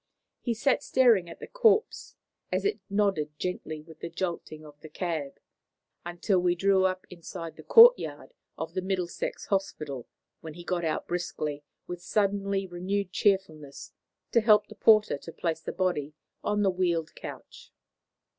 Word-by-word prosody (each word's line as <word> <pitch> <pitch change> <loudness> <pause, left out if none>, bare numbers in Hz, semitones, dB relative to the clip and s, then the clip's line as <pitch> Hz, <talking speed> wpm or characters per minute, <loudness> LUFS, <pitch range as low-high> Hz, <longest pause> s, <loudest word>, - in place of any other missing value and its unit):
He 235 -2 -1
sat 265 +4 +2
staring 230 -9 +3
at 165 - -11
the - - -7
corpse, 450 -3 +1 0.4
as - - -1
it 410 - 0
nodded 195 -8 0
gently 155 -4 -4
with 160 0 -15
the 170 - -5
jolting 165 -3 -5
of 145 -1 -14
the 155 - -12
cab, 155 -4 -4 0.6
until 175 +3 0
we 175 0 +2
drew 190 +1 +3
up 185 0 -1
inside 165 -1 -8
the - - -11
courtyard 485 +1 +6 0.2
of 165 0 -5
the 185 - -1
Middlesex 185 -2 -3
Hospital, 155 - -3 0.3
when 160 -2 -9
he 175 - -9
got 175 0 -2
out 160 - -2
briskly, 155 -4 -3 0.2
with 175 0 -7
suddenly 200 0 0
renewed 185 +2 -3
cheerfulness, 170 -8 -1 0.4
to 235 - +4
help 215 -1 +5
the - - -9
porter 215 -8 +4
to 165 - -10
place 165 -1 -3
the - - -5
body 155 -6 -1 0.3
on 210 0 +1
the 195 - +3
wheeled 175 -3 -1
couch. - - -10
180 Hz, 155 wpm, -28 LUFS, 160-200 Hz, 0.6 s, courtyard